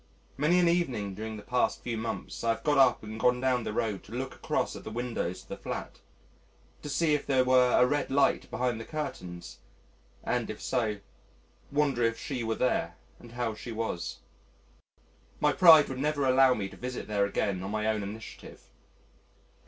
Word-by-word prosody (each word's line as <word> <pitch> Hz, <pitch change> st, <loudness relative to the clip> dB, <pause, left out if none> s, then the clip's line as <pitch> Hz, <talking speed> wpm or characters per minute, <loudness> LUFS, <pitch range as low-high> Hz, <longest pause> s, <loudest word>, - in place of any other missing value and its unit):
Many 155 Hz, +6 st, +3 dB
an 175 Hz, -1 st, +4 dB
evening 130 Hz, -, 0 dB
during 110 Hz, +2 st, -6 dB
the 105 Hz, -, -10 dB
past 125 Hz, +4 st, 0 dB
few 120 Hz, -2 st, -3 dB
months, 110 Hz, +1 st, -5 dB
I 115 Hz, -, +1 dB
have -, -, -15 dB
got 145 Hz, -2 st, +3 dB
up 130 Hz, -4 st, +4 dB
and 110 Hz, +1 st, -7 dB
gone 125 Hz, +1 st, +3 dB
down 125 Hz, -2 st, +1 dB
the -, -, -3 dB
road 105 Hz, -3 st, -2 dB
to -, -, -15 dB
look 130 Hz, +2 st, -4 dB
across -, -, -2 dB
at -, -, -9 dB
the -, -, -6 dB
windows 115 Hz, -6 st, -3 dB
of -, -, -25 dB
the -, -, -5 dB
flat, -, -, -6 dB, 0.8 s
to 150 Hz, -, -7 dB
see 155 Hz, +1 st, +2 dB
if 150 Hz, -, -1 dB
there 130 Hz, -2 st, +3 dB
were 125 Hz, -1 st, +4 dB
a 125 Hz, -, +6 dB
red 145 Hz, +3 st, 0 dB
light 140 Hz, +1 st, +2 dB
behind 125 Hz, -3 st, -1 dB
the -, -, -5 dB
curtains, 100 Hz, -, -6 dB, 0.6 s
and, -, -, -1 dB
if -, -, -6 dB
so, 110 Hz, -5 st, -1 dB, 0.7 s
wonder 140 Hz, -4 st, +1 dB
if 115 Hz, -1 st, +2 dB
she 135 Hz, -6 st, -4 dB
were 110 Hz, 0 st, -1 dB
there, 85 Hz, -9 st, 0 dB, 0.2 s
and 120 Hz, -1 st, -14 dB
how 120 Hz, -2 st, -2 dB
she 115 Hz, +3 st, -8 dB
was. 110 Hz, -6 st, -3 dB, 1.2 s
My 150 Hz, 0 st, +3 dB
pride 165 Hz, -5 st, +8 dB
would 130 Hz, -1 st, -5 dB
never 145 Hz, 0 st, 0 dB
allow 130 Hz, 0 st, +5 dB
me 100 Hz, -2 st, -3 dB
to -, -, -13 dB
visit 125 Hz, 0 st, -5 dB
there 100 Hz, -1 st, +1 dB
again 100 Hz, -2 st, -1 dB
on 95 Hz, -, -5 dB
my 105 Hz, +1 st, -2 dB
own 110 Hz, -1 st, +1 dB
initiative. 105 Hz, +3 st, -9 dB
125 Hz, 190 wpm, -29 LUFS, 110-135 Hz, 1.2 s, pride